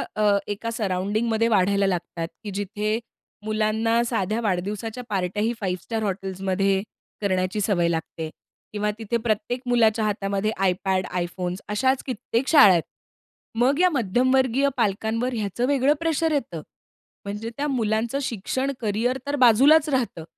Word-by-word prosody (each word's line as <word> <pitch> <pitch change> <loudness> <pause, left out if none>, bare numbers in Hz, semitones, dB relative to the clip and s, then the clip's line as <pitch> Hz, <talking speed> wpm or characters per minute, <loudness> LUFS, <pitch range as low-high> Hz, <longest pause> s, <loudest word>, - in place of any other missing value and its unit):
अ, 210 -1 +3
एका 215 +3 -3
सराउंडिंगमध्ये 220 +2 0
वाढायला 200 -2 +2
लागतात, 170 -2 -3 0.2
की 210 - -5
जिथे 210 +2 -2 0.5
मुलांना 220 +2 +1
साध्या 220 0 -1
वाढदिवसाच्या 210 +4 -2
पार्ट्याही 205 +4 -1
5 185 -2 -2
स्टार 225 -2 -3
हॉटेल्समध्ये 195 0 -1 0.4
करण्याची 185 +1 0
सवय 190 -4 +2
लागते. 160 -1 -3 0.4
किंवा 210 0 0
तिथे 225 +1 -1
प्रत्येक 220 +2 -2
मुलाच्या 225 -2 +3
हातामध्ये 200 0 -1
iPad, 185 +1 +1 0.2
iPhones, 180 +1 -4
अशाच 260 +5 +1
कित्येक 250 0 -2
शाळा 285 -11 +8
आहेत. 170 -3 +3 0.7
मग 260 +7 +2
या 365 - +5
मध्यमवर्गीय 260 - +2
पालकांवर 225 +3 0
ह्याचं 220 +2 -1
वेगळं 280 +1 +3
प्रेशर 325 -1 0
येतं. 230 - -2 0.6
म्हणजे 210 +3 -4
त्या 290 - -1
मुलांचं 230 -1 0
शिक्षण, 260 +3 -2
कॅरियर 225 +4 0
तर 285 - 0
बाजूलाच 280 +5 +5
राहतं. 245 - -1
215 Hz, 130 wpm, -24 LUFS, 195-245 Hz, 0.7 s, शाळा